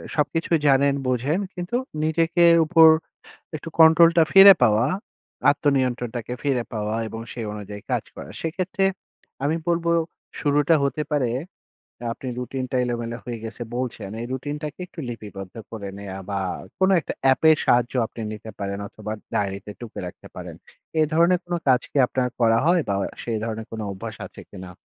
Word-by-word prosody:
সবকিছুই 160 +3 +1
জানেন, 140 0 +4
বোঝেন, 130 +7 0
কিন্তু 180 +5 -4 0.3
নিজেকে 165 +2 +2 0.2
উপর 165 0 +7 0.7
একটু 155 - -7
কন্ট্রোলটা 165 +1 +7
ফিরে 195 0 +10
পাওয়া, 110 +1 +4 0.6
আত্মনিয়ন্ত্রণটাকে 125 -5 -1
ফিরে 135 -4 +1
পাওয়া 105 0 -2
এবং 110 +1 -7
সেই 115 -2 -5
অনুযায়ী 105 -1 -8
কাজ - - 0
করা। - - -9
সেক্ষেত্রে 185 +5 -2 0.6
আমি 150 +3 +1
বলবো 170 0 +1 0.5
শুরুটা 145 +2 +3
হতে 140 +2 0
পারে, 135 -5 +1 0.7
অ্যা 120 - -5
আপনি 130 - -9
রুটিনটা 130 +1 -3
এলোমেলো 120 -1 -3
হয়ে 120 -1 -4
গেছে, 115 +2 -7
বলছেন। 125 -5 -4
এই - - -4
রুটিনটাকে 145 +4 -5
একটু 175 - -12
লিপিবদ্ধ 100 -5 -8 0.2
করে 105 -3 -6
নেয়া 100 -1 -7
বা, 100 - -1 0.4
কোনো 190 +1 +4
একটা - - -5
অ্যাপের 155 +4 +5
সাহায্য 120 0 +3
আপনি 115 - -9
নিতে 110 +1 -8
পারেন, 100 0 -3
অথবা 105 +1 -8 0.2
ডায়রিতে 100 0 -2
টুকে 120 -3 -8
রাখতে 90 - -11
পারেন। - - -8 0.4
এ - - +5
ধরনের 170 +2 +4
কোন 175 - -5
কাজ 130 -2 +5
কি - - -3
আপনার 125 0 0
করা 115 -1 +4
হয় 175 0 +4
বা, 100 - 0
অ - - 0 0.2
সে 120 - -4
ধরণের 110 -1 -5
কোনো 110 -1 -5
অভ্যাস 110 +3 -7
আছে - - -13
কিনা? 95 -2 -9
130 Hz, 160 wpm, -23 LUFS, 110-160 Hz, 0.7 s, ফিরে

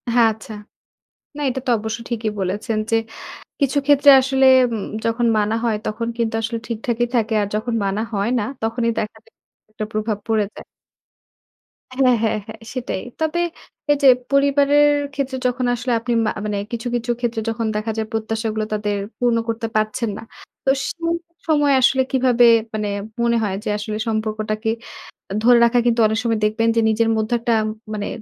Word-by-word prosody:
হ্যাঁ 230 -2 +6
আচ্ছা। 220 0 -11 0.8
না - - -6
এটা 265 +1 -3
তো - - +1
অবশ্য 220 +2 -4
ঠিকই 225 -2 -1
বলেছেন 210 +4 -2
যে, - - +2 0.7
কিছু 280 0 +1
ক্ষেত্রে 285 0 +6
আসলে 265 0 +2 0.3
উম 215 - -3 0.2
যখন 230 +1 +1
মানা 210 +1 +1
হয় 225 -2 +1
তখন 230 +2 -3
কিন্তু 230 -1 -1
আসলে 230 +1 -2
ঠিকঠাকই 235 +1 -1
থাকে। 225 -1 +1
আর 200 - -1
যখন 230 +2 -2
মানা 195 +2 -1
হয় 200 +3 0
না 210 - -1 0.2
তখনই 230 +1 0
দেখা 215 +1 -4 0.6
একটা 215 - -5
প্রভাব 215 -1 -1
পড়ে 220 -2 +2
যায়। - - -10 1.3
হ্যাঁ, 255 -2 +4
হ্যাঁ, 220 -1 +1
হ্যাঁ 220 0 -9
সেটাই। 250 -7 -4 0.2
তবে 320 +2 0 0.5
এই 290 - +3
যে - - +7 0.2
পরিবারের 285 +1 +4 0.3
ক্ষেত্রে 270 -1 -3
যখন 250 0 -1
আসলে 245 +1 -3
আপনি 240 +1 -2
মা - - +1
মানে 210 -1 -2
কিছু, 235 +1 -4
কিছু 240 0 -1
ক্ষেত্রে 235 -2 -2
যখন 225 0 -2
দেখা 215 +1 -1
যায় 220 0 -2
প্রত্যাশাগুলো 220 -1 -2
তাদের 210 -1 -1 0.2
পূর্ণ 240 -2 +2
করতে 225 0 -2
পারছেন 215 +2 0
না। 220 - -8 0.4
তো - - +2 0.2
সেই 335 0 -2 0.3
সময় 295 -3 +3
আসলে 265 +1 +4
কিভাবে 250 -2 +4 0.3
মানে 210 -1 -2 0.3
মনে 235 0 +2
হয়? 195 -2 -1
যে 215 - -3
আসলে 215 0 -4
সম্পর্কটাকে 215 0 -2 0.7
ধরে 245 0 +6
রাখা 240 +1 +3
কিন্তু 235 -1 +2
অনেক 220 - -1
সময় 225 -2 0
দেখবেন 225 +2 +1
যে 230 - +3
নিজের 225 +1 +2
মধ্যে 220 +2 -1
একটা 230 0 0 0.4
মানে 205 -1 -3
230 Hz, 170 wpm, -20 LUFS, 215-245 Hz, 1.3 s, যে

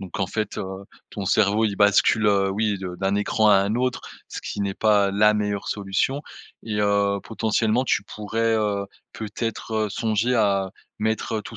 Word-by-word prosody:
Donc 95 -1 -6
en 95 - +1
fait, 110 +2 -3
heu, 95 0 -6 0.2
ton 100 - -6
cerveau 105 +3 +2
il 105 -2 -1
bascule, 105 +1 +4
heu 100 -1 +3
oui 105 +1 0
de 90 -2 -6
d'un 95 +2 0
écran 105 +1 +2
à 105 - +7
un 100 +2 +2
autre. 125 0 -1 0.3
Ce - - -6
qui - - -5
n'est 100 -1 -1
pas 105 -2 +3
la 105 +2 +4
meilleure 105 -1 -2
solution. 100 +7 -1 0.4
Et, 110 -2 -4
heu, 100 -1 +1
potentiellement 110 +2 0
tu 125 - +1
pourrais, 110 +3 -2
heu, 105 -2 0 0.3
peut-être, 110 +1 -5
heu, - - -5
songer 110 +3 0
à 100 -4 +1 0.3
mettre 110 0 -1
tout 115 - -10
105 Hz, 180 wpm, -23 LUFS, 100-110 Hz, 0.4 s, à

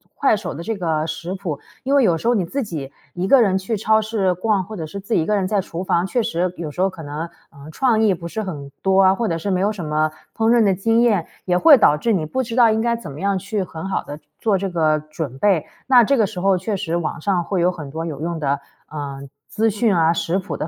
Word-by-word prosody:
快 275 -6 +3
手 - - -5
的 165 - -7
这 225 +5 -2
个 160 -3 -1
食 165 +3 -5
谱。 180 -7 -4 0.2
因 275 +2 0
为 275 - +5
有 170 -6 +3
时 225 - -4
候 245 - +4
你 190 -6 +1
自 275 +10 -3
己 155 - -6 0.2
一 185 +2 -2
个 270 +2 +6
人 195 -4 +3
去 190 +4 -2
超 220 +1 +3
市 210 -4 0
逛， 195 +1 0
或 215 +4 -9
者 160 - -4
是 200 +5 -7
自 200 +4 -4
己 165 - +3
一 - - -1
个 210 - +1
人 195 -2 0
在 205 -1 +1
厨 175 +1 -6
房， 175 -1 +1
确 240 +3 0
实 180 -4 -1
有 160 -3 -5
时 180 - -4
候 195 - +3
可 170 -4 -10
能， 150 +4 -5 0.2
嗯， 140 +1 -12
创 230 +2 +2
意 215 -3 +4
不 170 -1 -6
是 220 - -4
很 145 -9 -6
多 190 0 +4
啊， 190 - +6
或 230 0 -1
者 165 - -1
是 195 +5 -3
没 185 - +1
有 205 +2 +2
什 185 -6 -6
么 155 0 0 0.2
烹 225 0 +2
饪 235 -1 +5
的 195 -2 +3
经 225 +5 +2
验， 210 -8 +2 0.2
也 180 -1 +2
会 290 - +8
导 150 -9 +4
致 230 +8 0
你 170 -6 0
不 260 +12 -2
知 230 -1 -5
道 235 -3 +6
应 220 0 +1
该 235 0 +1
怎 185 -11 -8
么 140 - -9
样 200 0 0
去 205 +2 -2
很 165 0 -7
好 195 - -1
地 145 +1 -8 0.2
做 210 -4 +2
这 195 +1 -2
个 155 -3 +2
准 155 -3 -6
备。 185 -3 +2 0.2
那 250 -3 +7
这 275 +4 +2
个 220 - +4
时 195 -2 -6
候 195 0 +3
确 200 +4 -2
实 180 -4 -2
网 170 0 -3
上 180 -1 +1
会 185 0 -1
有 180 - +3
很 150 -6 -8
多 165 +2 -4
有 150 -3 -6
用 170 0 -3
的， 140 -2 0 0.3
呃， 145 -2 -6 0.3
资 225 +1 +1
讯 215 -1 +1
啊， 165 -1 +4
食 170 +2 -1
谱 190 - -5
的 155 - -3
185 Hz, 305 characters per minute, -21 LUFS, 160-215 Hz, 0.3 s, 会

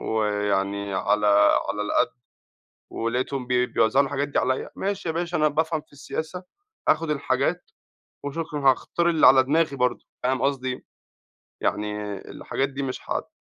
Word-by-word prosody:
ويعني 100 -2 0
على 105 +2 +1 0.4
على 105 - -1
القد، 155 +9 +1 0.8
ولاقيتهم 125 +3 -2
بي 125 0 +2
بيوزعوا 125 +3 +3
الحاجات 140 +1 -2
دي 145 - -1
عليَّ، 130 0 0
ماشي 195 -2 -2
يا 160 - +1
باشا 175 0 -1
أنا 155 0 +4
بافهم 160 +1 0
في - - -30
السياسة، 160 +5 -5 0.4
آخد 165 0 +2
الحاجات، 140 +4 -1 0.5
وشكرًا 150 +1 -4
هاختار 170 +6 0
اللي 160 -2 +5
على 130 0 +8
دماغي 150 +1 +1
برضه، 125 -2 0 0.2
فاهم 130 +1 0
قصدي 135 -2 0
أيه؟ 125 - -5 0.8
يعني 105 -1 -2
الحاجات 135 0 -2
دي 140 0 -4
مش 130 -1 -3
هت - - -2
135 Hz, 150 wpm, -25 LUFS, 115-155 Hz, 0.8 s, على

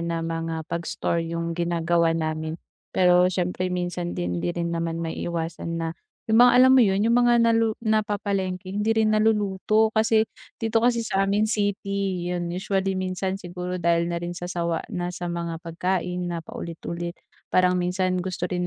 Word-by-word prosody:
na 170 -1 -2
mga 165 -1 -3
pag-store 170 +1 -2
'yung 170 0 -3
ginagawa 170 -1 +1
namin. 155 0 -2 0.4
Pero 180 0 +5
siyempre 180 0 -1
minsan 175 -1 -3
din 90 0 -2
hindi - - -1
rin 170 0 -1
naman 165 0 -2
maiiwasan 165 0 -4
na 165 -1 -2 0.4
'yung 225 - +6
mga, 245 0 +8
alam 260 - +6
mo 265 - +7
'yun? 195 -4 +3
'Yung 230 +1 +3
mga 240 0 +4
nalu 225 -1 +2
napapalengke 200 -4 -1
hindi 210 +3 0
rin 215 -1 +3
naluluto, 215 0 +2
kasi 220 0 +3 0.3
dito 225 -1 +1
kasi 235 0 +2
sa 195 -2 +1
amin 205 +2 +2
city, 200 -3 -1
'yun 175 -1 -2
usually 190 +1 -1
minsan 185 0 -2
siguro 180 -1 -5
dahil 170 -1 +1
na 170 - -2
rin 175 0 -4
sa 175 0 -6
sawa 170 -2 -1
na 175 0 -3
sa 175 0 -5
mga 170 -1 -4
pagkain 180 +1 -2
na 170 -1 -3
paulit-ulit 170 +1 -6 0.3
parang 180 0 +3
minsan 185 +1 0
gusto 180 0 -4
rin 180 -1 -1
180 Hz, 165 wpm, -25 LUFS, 170-200 Hz, 0.4 s, mga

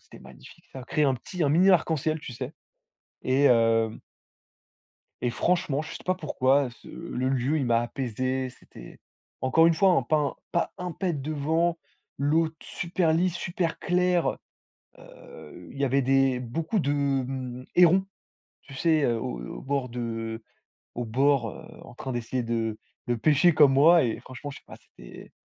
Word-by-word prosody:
c'était - - -16
magnifique. - - -15
Ça 135 - -8
a 125 - -10
créé 150 - 0
un 135 -2 +3
petit 175 +7 -5
un 145 - +3
mini 180 +6 +5
arc 175 -3 +3
en 160 - +2
ciel, 155 +3 -2
tu 130 - -8
sais. 130 +4 -6 0.7
Et 135 +2 +3
heu 115 -2 +2 1.2
Et 125 - +1
franchement, 155 0 0
je 155 - -9
sais - - -7
pas 185 - +1
pourquoi 140 -5 +1
heu, - - -7
ce 120 - -16
le 130 -6 -4
lieu, 135 +4 0
il 135 - -1
m'a 115 -1 +3
apaisé. 130 +1 -3
C'était, - - -14 0.4
encore 160 +5 +4
une 165 - +4
fois 190 +4 +4
hein, 170 -7 +3
pas 150 -2 +1
pas 170 - -1
un 180 -1 -4
pet 180 0 -2
de 150 +4 -4
vent, 160 +3 0 0.4
l'eau 155 +3 +2
d 160 - -18
super 170 -2 -1
lisse, 175 +1 +1
super 175 -1 -2
claire 180 -1 +1
heu. - - -7 0.6
Heu, 85 +3 -13
il - - -11
y 140 - +1
avait 135 +1 +2
des 135 0 +2
beaucoup 155 - -2
de 145 -6 0 0.4
hem, 130 -1 -6
hérons. 180 +2 +5 0.6
Tu 135 - -13
sais? 155 0 +2
Au 115 - -2
heu, - - -8
au - - -8
bord 135 -1 -2
de 120 +1 -6
heu, 115 -1 -4 0.5
au 120 - -3
bord 130 0 +2
heu, - - -11 0.2
en - - -13
train 130 +1 -6
d'essayer 120 +1 -3
de 115 -2 -2 0.3
de 120 - +1
pêcher 155 +7 +4
comme 145 -3 +6
moi. 165 +5 +6
Et 115 -3 -2
franchement, 130 +3 -9
je - - -10
sais - - -34
pas, - - -11
c'était - - -14
140 Hz, 190 wpm, -26 LUFS, 125-165 Hz, 1.2 s, comme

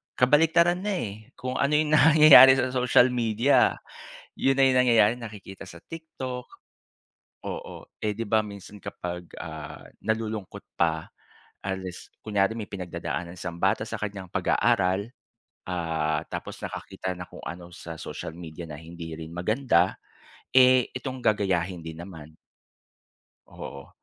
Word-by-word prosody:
kabaliktaran 165 +6 +4
na 205 0 -1
eh. 110 - -6
Kung 130 0 -4
ano 140 +2 +1
yung 150 0 +2
nangyayari 150 -4 +9
sa 130 -1 0
social 125 0 +4
media, 120 +2 +3 0.6
'yon 135 0 +2
na - - +6
yung 130 - +3
nangyayari, 115 -3 +5
nakikita 105 -5 -9
sa 85 -2 -12
TikTok, 130 - -7 1.0
oo. - - -6 0.2
Eh 105 -1 -1
'di 115 - -3
ba 110 +1 +4
minsan 100 0 -10
kapag, 90 0 -6 0.2
ah, 80 -2 -8 0.2
nalulungkot 110 -3 -3 0.2
pa, 80 -2 +1 0.6
unless 95 -2 -5 0.2
kunyare 105 0 +1
may 105 -3 -6
pinagdadaanan 90 -1 -5
isang 85 0 -6
bata - - +2
sa - - -6
kanyang 100 -3 -5
pag-aaral, 95 +2 +1 0.6
ah, 80 -3 -1
tapos - - -6
nakakita 95 - -5
ng 90 - -7
kung - - -11
ano 85 +1 -7
sa 80 -1 -8
social - - -6
media 85 -1 -8
na 75 - -8
hindi 80 0 -9
rin 80 - -7
maganda, 95 -1 +1 0.6
eh 130 -1 +6
itong 130 0 -5
gagayahin 95 -4 0
din 80 0 -8
naman, 80 -4 -10
oo. - - -27 1.1
Oo. 70 - -9
100 Hz, 135 wpm, -26 LUFS, 85-125 Hz, 1.1 s, nangyayari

